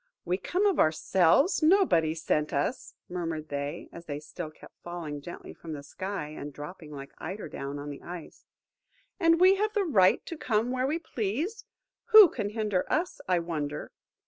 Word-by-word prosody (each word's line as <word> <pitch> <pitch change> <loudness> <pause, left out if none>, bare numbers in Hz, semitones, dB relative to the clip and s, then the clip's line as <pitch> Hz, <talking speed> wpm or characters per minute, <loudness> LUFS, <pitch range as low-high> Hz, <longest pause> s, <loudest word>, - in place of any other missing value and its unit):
"We 180 +2 0
come 375 - 0
of 400 -3 +3
ourselves, 175 - +3
nobody 310 - +4
sent 150 -2 0
us," 145 - -2
murmured 165 -3 -4
they, 140 0 -4
as 170 - -10
they 145 -1 -3
still 155 +2 -7
kept 155 - -16
falling 165 -4 -5
gently 175 - -9
from 165 -2 -8
the 145 -1 -7
sky, 185 +1 -5
and 150 -1 -7
dropping 150 +3 -9
like 140 -2 -8
eider 190 +6 -5
down 140 +1 -5
on 145 +1 -6
the 140 - -9
ice; 175 -2 -9 0.8
"and 330 -2 +4
we 375 +2 +6
have 425 +1 0
the 405 -1 +1
right 195 - +4
to 335 - -5
come 230 -2 0
where 255 +1 0
we 305 +4 0
please. 305 - -3 0.4
Who 430 -5 +9
can 210 -7 -3
hinder 210 -4 -1
us, 350 +3 0
I 180 -1 +3
wonder? 150 -4 -3
180 Hz, 175 wpm, -29 LUFS, -, 0.8 s, Who